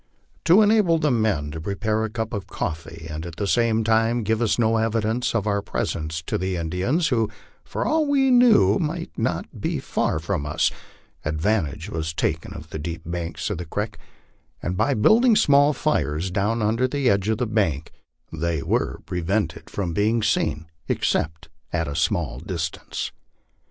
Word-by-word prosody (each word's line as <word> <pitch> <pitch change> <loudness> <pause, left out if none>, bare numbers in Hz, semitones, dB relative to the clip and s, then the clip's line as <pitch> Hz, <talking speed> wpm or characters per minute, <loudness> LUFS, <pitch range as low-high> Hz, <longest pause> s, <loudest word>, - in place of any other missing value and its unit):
To 190 +6 +7
enable 205 -6 +4
the 150 -2 +1
men 105 -11 +1
to 80 +1 -6
prepare 105 +4 -1
a 110 - -1
cup 110 0 -4
of 100 -3 -4
coffee, 80 -1 -5
and 75 0 -5
at 85 -1 -7
the 100 - -2
same 115 +1 +2
time 115 +1 +2
give 110 +2 0 0.2
no 115 -1 +3
evidence 115 +2 0
of 105 -3 +1
our 100 -1 +1
presence 80 -3 -3
to - - -2
the 95 0 -1
Indians, 90 - 0
who, 115 -4 +1 0.3
for - - -3
all 315 -1 +2
we 270 -2 +3
knew, 245 -5 +6
might 165 0 -3
be - - -2
not - - -4
far - - 0
from 80 -2 -2
us, 80 +3 +1 0.5
advantage 80 +1 -1
was 80 0 -3
taken 80 0 -1
of 80 +1 -10
the - - -4
deep 80 +3 -5
banks 85 0 -3
of - - -3
the 90 - -4
creek, 105 +6 -4 0.6
and 90 - -3
by 140 +8 +2
build 215 - +5
ing 235 -3 +6
small 145 -7 +5
fires 95 - 0
down 105 +4 0
under 115 +4 +2
the 140 0 -1
edge 100 -1 +2
of 110 - +1
the 125 - 0
bank, 95 - 0 0.4
they 80 -2 -1
were - - -1
prevented 90 0 -2
from 90 -5 -3
being 110 +5 +1
seen, 75 -5 0 0.2
except 80 +1 -1 0.2
at 85 -2 -1
a 70 - -4
small 85 -5 0
distance. 85 -2 -4
105 Hz, 175 wpm, -24 LUFS, 80-120 Hz, 0.6 s, To